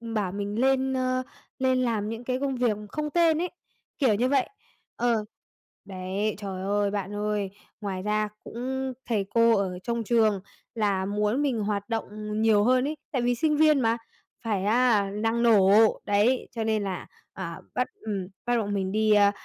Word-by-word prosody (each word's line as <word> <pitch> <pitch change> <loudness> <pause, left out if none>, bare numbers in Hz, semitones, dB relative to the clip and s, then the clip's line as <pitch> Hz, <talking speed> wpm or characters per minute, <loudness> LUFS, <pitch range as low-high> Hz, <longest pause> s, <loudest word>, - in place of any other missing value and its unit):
bảo 220 -5 -2
mình 205 +2 -3
lên, 265 0 +2
ơ, 255 0 0 0.4
lên 260 -1 +2
làm 220 -4 0
những 225 +2 -5
cái 255 +1 -1
công 275 -2 -1
việc 240 -4 +1
không 300 +5 -3
tên 330 -1 +3
ấy, 360 - -2 0.5
kiểu 255 -7 +3
như 245 +5 +1
vậy. 275 -2 +2 0.5
Ờ, 235 -3 +1 0.6
đấy, 190 +2 -3
trời 195 -2 -5
ơi, 200 +1 +1
bạn 200 0 -3
ơi, 210 -1 -1 0.3
ngoài 190 -2 -3
ra 210 0 0
cũng 260 +2 -4 0.2
thầy 210 -4 +1
cô 230 0 +5
ở 185 -2 -2
trong 235 -1 -2
trường 220 -3 +2 0.3
là 200 -4 +1
muốn 210 +6 0
mình 270 -6 0
hoạt 205 0 -2
động 215 -1 -3
nhiều 220 -2 +4
hơn 255 +3 +3
ấy, 305 +1 -3
tại 260 - 0
vì 245 0 +1
sinh 300 +4 +1
viên 305 -2 +5
mà 230 0 +2 0.5
phải 200 -4 0
á 220 -2 +3
năng 225 +3 0
nổ, 210 -5 +5 0.4
đấy, 210 +5 +2
cho 230 -2 -3
nên 220 -1 0
là, 190 -2 -4 0.3
à, - - -6
bắt - - +1
ừm, 200 -4 -3 0.2
bắt 240 0 +2
bọn 205 -3 -1
mình 190 -1 -1
đi, 215 +1 +3
ờ, 205 -1 +5
220 Hz, 180 wpm, -26 LUFS, 205-250 Hz, 0.6 s, cô